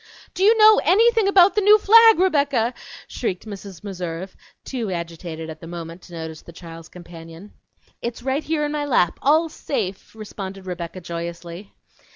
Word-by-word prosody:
"Do - - -6
you 440 +3 +5
know 430 0 +7
anything 450 +4 +3
about 390 -1 +5
the 420 - +1
new 415 +2 +6
flag, 450 +2 +6
Rebecca?" 280 -9 +1 0.3
shrieked 190 -6 -4
Mrs. 200 -4 -10
Meserve, 185 -2 -6 0.3
too 240 -6 -4
agitated, 170 -2 -6
at 155 -1 -9
the 165 - -10
moment, 170 0 -8
to 175 - -16
notice 160 -1 -7
the - - -14
child's 165 -1 -12
companion. 170 +2 -13 0.5
"It's 235 0 -6
right 270 +3 -1
here 305 -1 -1
in 295 - -3
my 300 -1 -2
lap, 205 -11 +1
all 315 +4 +3
safe," 210 -11 -5
responded 195 -3 -8
Rebecca 180 0 -6
joyously. 170 +2 -7
195 Hz, 165 wpm, -21 LUFS, -, 0.5 s, know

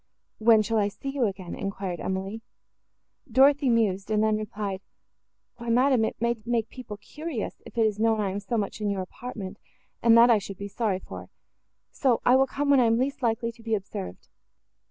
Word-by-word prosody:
"When 220 -1 +5
shall 225 +1 0
I 205 - +2
see 205 +7 -6
you 270 -4 +1
again?" 190 -3 -6
enquired 195 -3 -4
Emily. 195 +4 -3 0.9
Dorothée 275 +1 +5
mused, 205 -4 +1
and 215 0 +2
then 215 0 +2
replied, 205 -2 -4 0.8
"Why, 235 0 -6
madam, 250 0 +4
it - - -4
may 235 0 0
make 230 -1 -1
people 245 -5 -8
curious, 300 +3 -6
if - - -14
it 225 - +4
is 210 -1 -1
known 225 0 +2
I 200 -2 0
am 200 - -3
so 215 +4 -3
much 210 0 -3
in 210 - 0
your 195 -2 -1
apartment, 205 -1 -8 0.4
and 230 0 +6
that 235 +1 +7
I 220 - +5
should 195 -1 -8
be 200 - -5
sorry 205 -2 -1
for; - - -10 0.6
so 260 -7 +1
I 250 - +6
will 270 +1 +4
come 285 +2 0
when 275 - +6
I 245 - +4
am 225 0 +3
least 275 +3 -1
likely 230 -1 0
to 230 0 -19
be 225 -1 0
observed. 95 - -7
225 Hz, 200 wpm, -26 LUFS, 200-240 Hz, 0.9 s, that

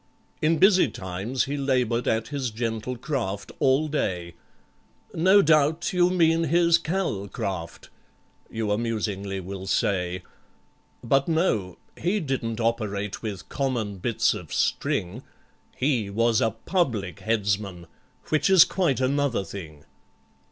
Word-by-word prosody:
In 160 +1 +3
busy 190 +2 +5
times 100 +6 -3
he 140 +1 -3
laboured 125 -4 0
at 110 0 0
his 140 -3 -2
gentle 115 +2 -3
craft 115 -7 -3
all 135 +3 +3
day— 90 - -2 0.8
"No 190 +5 +5
doubt 155 +3 +2
you 180 0 +4
mean 165 -2 +3
his 170 +1 +4
Cal 165 - -2
craft," 95 -6 -5 0.6
you 110 -2 -2
amusingly 105 -3 -2
will 95 +1 -7
say— 90 -2 0 0.8
But, 135 +3 +2
no—he 160 - -1
didn't 130 - -3
operate 105 -3 -2
with 100 -5 -6
common 120 -8 -2
bits 115 +2 +1
of 90 -8 -8
string, 95 +8 -1 0.5
He 125 -7 0
was 115 +2 +2
a 115 - +3
Public 110 - -2
Headsman, 100 -5 -1 0.4
which 155 +4 +2
is 190 -4 +8
quite 170 -9 0
another 135 -4 +1
thing. 80 -6 -9
115 Hz, 120 wpm, -25 LUFS, 100-150 Hz, 0.8 s, is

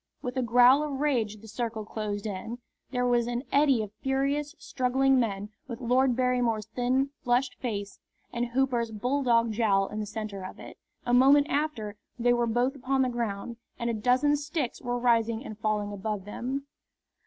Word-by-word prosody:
With 250 0 -4
a 260 - +1
growl 245 +3 +6
of 290 -3 -3
rage 230 -8 0
the 225 - -12
circle 225 -1 -4
closed 210 -1 -4
in. 215 +3 -4 0.3
There 250 -1 0
was 240 -1 +2
an 240 +1 -2
eddy 275 -5 +4
of 205 - -8
furious, 280 +3 0
struggling 265 +1 +2
men, 205 -3 -1 0.2
with 235 -2 -6
Lord 255 +1 +2
Barrymore's 245 -4 +1
thin, 255 +4 0
flushed 245 +2 +1
face 205 -5 -4 0.3
and 240 0 -1
Hooper's 240 -2 0
bulldog 235 0 +1
jowl 205 -3 +2
in 215 - -5
the 210 - -3
centre 210 -2 -5
of 185 - -8
it. - - -11 0.3
A 245 - 0
moment 275 +3 +6
after 245 -9 -2 0.2
they 245 0 +3
were 240 -1 +1
both 245 +4 +1
upon 265 0 +1
the 255 - +1
ground, 235 -1 -3 0.2
and 235 -1 -1
a - - -2
dozen 250 +6 +3
sticks 295 -3 -3
were 245 0 -2
rising 230 0 +1
and 215 -1 -8
falling 210 -1 -1
above 205 -1 -4
them. 260 +6 -4
245 Hz, 175 wpm, -28 LUFS, 220-265 Hz, 0.3 s, growl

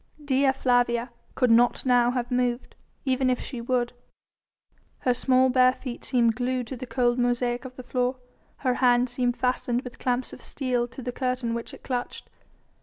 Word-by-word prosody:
Dea 270 -1 +3
Flavia 245 -2 +1 0.2
could 250 -3 +3
not 240 +3 +4
now 245 -1 +4
have 245 -1 -2
moved, 245 0 -1 0.3
even 260 -1 +2
if 250 - +1
she 250 -4 -6
would. 245 0 0 1.1
Her 250 - +2
small 260 +1 +3
bare 255 0 +5
feet 250 -2 -7
seemed 235 -3 +2
glued 250 0 -1
to 265 - -4
the 255 +1 -7
cold 245 0 +1
mosaic 245 +1 0
of 255 0 -9
the 255 - -9
floor, 250 +1 -1 0.5
her 255 - +3
hand 245 -1 +3
seemed 245 -1 0
fastened 250 0 0
with 250 - -10
clamps 250 0 -1
of - - -10
steel 250 -3 -1
to 255 +1 -10
the 250 - -3
curtain 250 -2 -2
which 235 0 -5
it - - -13
clutched. 250 -2 -4
250 Hz, 180 wpm, -26 LUFS, 245-255 Hz, 1.1 s, bare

